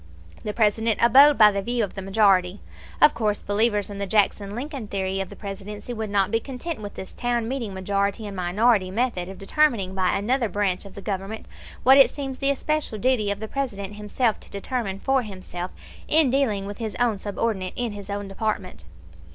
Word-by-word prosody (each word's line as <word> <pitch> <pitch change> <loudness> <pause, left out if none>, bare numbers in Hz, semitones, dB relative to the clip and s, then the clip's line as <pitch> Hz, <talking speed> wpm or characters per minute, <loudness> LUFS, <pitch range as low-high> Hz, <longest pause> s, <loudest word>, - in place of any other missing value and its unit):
The 210 - -2
President 220 0 +2
abode 275 +5 +7
by 215 -2 +8
the 200 0 -2
view 240 +2 -1
of 200 - -4
the 195 - -6
majority. 195 -1 +3 0.4
Of 300 - +7
course 210 -3 -1
believers 210 0 +1
in 200 -1 -7
the 200 - -2
Jackson 200 0 +1
Lincoln 270 -2 -5
theory 190 -1 -2
of 195 - -3
the - - -10
Presidency 205 +3 -7
would 220 -2 -4
not 200 -1 +1
be 225 - +2
content 270 +3 -6
with 205 -1 -7
this 190 - -8
town 240 -2 -1
meeting 245 -4 -3
majority 200 +2 -1
and 200 -1 -6
minority 190 +2 +2
method 195 -4 -1
of 190 - -9
determining 200 -4 +1
by 185 -1 +1
another 235 +3 0
branch 195 -1 -1
of 200 - -12
the 200 - -9
Government 200 +2 -4 0.4
what 265 +2 +7
it 270 - +8
seems 270 -2 -5
the 275 - +2
especial 290 -3 -1
duty 235 -2 +1
of 200 0 -2
the 220 - -5
President 210 -7 -4
himself 210 +2 0
to - - -14
determine 200 -1 -3
for 270 +4 +2
himself 185 -4 -6 0.4
in 310 -4 +4
dealing 230 -8 +1
with 205 +2 -7
his 220 -3 -4
own 235 -5 +1
subordinate 200 -2 -2
in 240 -2 -1
his 205 0 -9
own 200 0 -3
department. 195 - -3
210 Hz, 200 wpm, -24 LUFS, 195-240 Hz, 0.4 s, by